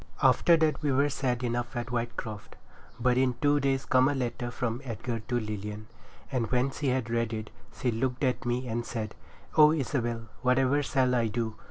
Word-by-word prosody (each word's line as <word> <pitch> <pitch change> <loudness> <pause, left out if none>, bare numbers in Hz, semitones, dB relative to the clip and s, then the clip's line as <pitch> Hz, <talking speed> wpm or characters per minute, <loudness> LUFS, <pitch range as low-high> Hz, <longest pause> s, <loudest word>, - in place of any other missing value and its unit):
After 170 -2 +5
that 160 -1 +1
we 145 - +1
were 140 +2 +3
sad 130 -3 -1
enough 120 +1 -2
at 120 +1 -3
Whitecroft. 115 -3 -4 0.4
But 125 +1 +3
in 130 -2 +2
two 145 +1 +3
days 135 -1 0
come 130 +1 +4
a 145 - 0
letter 120 -1 -2
from 120 0 -3
Edgar 115 -1 -4
to 120 +3 -2
Lilian; 105 -1 -5 0.5
and 120 -5 -1
when 125 +2 +1
she 145 +1 -3
had 125 -3 0
read 115 -1 0
it, 110 -1 -5 0.3
she 125 - +1
looked 125 +4 -1
at 130 -2 +1
me 125 +1 -1
and 120 0 -2
said, 110 -3 -4 0.4
'O 150 -1 +8
Isabel, 120 -6 -1 0.2
whatever 130 +3 +3
shall 130 -2 +1
I 120 -2 +2
do? 110 0 -2
125 Hz, 190 wpm, -29 LUFS, 115-135 Hz, 0.5 s, O